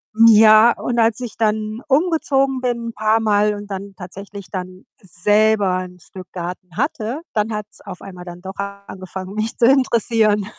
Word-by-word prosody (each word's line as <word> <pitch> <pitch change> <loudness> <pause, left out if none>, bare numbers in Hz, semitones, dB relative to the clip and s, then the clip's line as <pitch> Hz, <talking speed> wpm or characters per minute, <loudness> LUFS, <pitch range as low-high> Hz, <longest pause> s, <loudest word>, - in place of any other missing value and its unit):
hm, 230 +1 +6
ja, 220 +1 +7
und 240 -1 -2
als 225 0 +2
ich 235 -3 -7
dann 215 +1 -1
umgezogen 275 -3 +1
bin 235 -2 -2
paarmal 215 -1 +2
und 205 0 -8
dann 195 +1 -6
tatsächlich 195 +1 -9
dann 185 -1 -7 0.2
selber 205 +1 +2
‘n 180 0 -12
Stück 185 +1 -12
Garten 180 -1 -7
hatte, 250 +1 -2
dann 215 +1 -1
hat‘s 210 0 -7
auf 190 -3 -10
einmal 180 -2 -10
dann 175 0 -10
doch 190 +1 -8 0.3
angefangen, 185 0 -8
mich 215 +1 -2
zu 235 - +3
interessieren. 230 -5 +2
210 Hz, 160 wpm, -19 LUFS, 190-230 Hz, 0.3 s, ja